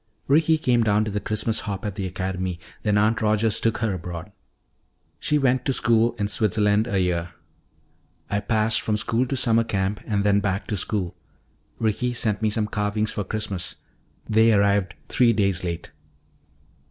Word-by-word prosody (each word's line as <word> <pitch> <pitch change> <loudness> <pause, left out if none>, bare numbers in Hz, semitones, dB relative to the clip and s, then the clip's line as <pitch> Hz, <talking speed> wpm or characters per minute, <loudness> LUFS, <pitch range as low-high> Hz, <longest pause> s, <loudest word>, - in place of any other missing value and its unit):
"Ricky 160 +3 +4
came 125 -6 +2
down 105 -1 +2
to 110 - -3
the 105 - -1
Christmas 110 +2 0
hop 100 -1 -5
at 105 - -2
the 95 -1 -3
academy, 90 0 -3 0.2
then 105 -2 +1
Aunt 110 +2 +2
Rogers 110 0 +2
took 115 -1 0
her 110 -2 -1
abroad. 90 +2 -6 0.9
She 150 - +1
went 130 -3 +2
to 135 - +1
school 115 -1 +2
in 100 - -1
Switzerland 105 +1 +1
a 100 -5 0
year. 90 -1 -1 0.9
I 100 - 0
passed 110 +1 +1
from 105 -1 0
school 115 +4 0
to 135 - -2
summer 115 -1 +3
camp 100 -2 -1
and 100 -2 0
then 100 0 +3
back 100 0 -1
to 105 - 0
school. 95 -1 -2 0.6
Ricky 115 +3 0
sent 110 -3 -1
me 110 - +2
some 105 0 0
carvings 105 0 -1
for 105 - -3
Christmas 100 -3 -4 0.5
they 110 +1 +4
arrived 100 -3 +2
three 120 -2 +3
days 100 -4 +1
late." 85 -5 -4
105 Hz, 170 wpm, -24 LUFS, 100-115 Hz, 0.9 s, Ricky